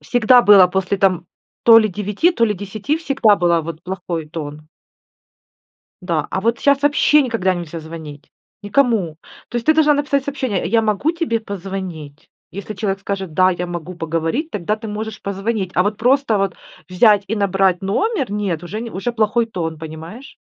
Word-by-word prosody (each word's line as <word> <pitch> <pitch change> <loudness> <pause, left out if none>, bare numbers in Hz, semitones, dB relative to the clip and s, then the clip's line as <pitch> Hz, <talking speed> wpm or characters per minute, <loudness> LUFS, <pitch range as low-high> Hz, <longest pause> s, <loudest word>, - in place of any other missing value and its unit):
всегда 245 +1 +4
было 200 -4 +7
после 190 +2 -1
там 185 -3 +1 0.4
то 230 -1 +8
ли 215 - +2
9, 210 - 0
то 230 - +2
ли 210 - -1
10, 205 - -3
всегда 270 -9 +2
было 170 -2 +2
вот 165 0 -8
плохой 180 -4 -5
тон. 150 -1 -7 1.4
Да, 165 -4 -1
а 190 - -2
вот 230 +3 0
щас 280 0 +3
вообще 295 +1 +4
никогда 230 -8 0
нельзя 170 -2 -6
звонить, 155 -2 -10 0.3
никому. 205 - +1 0.3
То 240 - -5
есть 235 - -4
ты 315 - +5
должна 305 -1 +4
написать 285 -1 0
сообщение: 260 -9 -2
"Я 225 +3 +2
могу 220 +9 0
тебе 330 -10 -1
позвонить?" 185 -7 -7 0.2
Если 200 +3 -7
человек 195 -1 -2
скажет: 195 -4 -5
"Да, 185 +2 +4
я 180 0 -3
могу 175 0 -6
поговорить",- 165 - -2
тогда 210 +2 -2
ты 220 0 -8
можешь 215 0 -5
позвонить. 200 0 -3
А 180 - +3
вот 205 +2 -2
просто 250 -2 +2
вот 195 -3 -1 0.3
взять 205 +2 +4
и 220 - -2
набрать 195 -2 +1
номер- 270 - -1
нет, 195 -6 -2
уже 210 +5 -5
не, 235 0 -6
уже 220 +6 -3
плохой 225 +1 +1
тон, 165 -7 -4
понимаешь? 160 - -10
200 Hz, 175 wpm, -19 LUFS, 175-230 Hz, 1.4 s, то